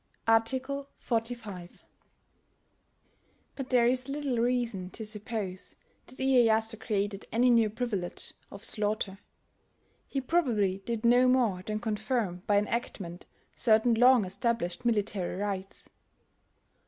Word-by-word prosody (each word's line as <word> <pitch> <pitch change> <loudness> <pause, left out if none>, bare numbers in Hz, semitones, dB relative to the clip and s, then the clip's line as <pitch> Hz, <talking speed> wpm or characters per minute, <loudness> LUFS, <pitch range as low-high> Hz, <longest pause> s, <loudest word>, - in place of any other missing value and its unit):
[Art. 225 +1 +4 0.5
45.] 225 -6 -4 1.7
But 265 -2 -6
there 245 -2 +4
is 255 +2 +1
little 275 -4 -1
reason 235 -6 0
to 220 - -5
suppose 210 -3 -3 0.3
that 255 - -11
Iyeyasu 225 -4 +3
created 205 -2 -2
any 245 +3 +4
new 230 -2 +4
privilege 210 -6 -4 0.2
of 200 +1 -10
slaughter: 210 -3 +1 0.9
he 275 - -2
probably 240 - +1
did 230 +3 -4
no 245 +2 +5
more 240 -8 +2
than 215 +3 -3
confirm 215 -4 -2
by 205 - +4
enactment 205 -5 -3 0.3
certain 225 0 +4
long 245 -1 +5
established 200 0 -2
military 205 -6 0
rights. 195 -1 -4
225 Hz, 110 wpm, -29 LUFS, 200-245 Hz, 1.7 s, no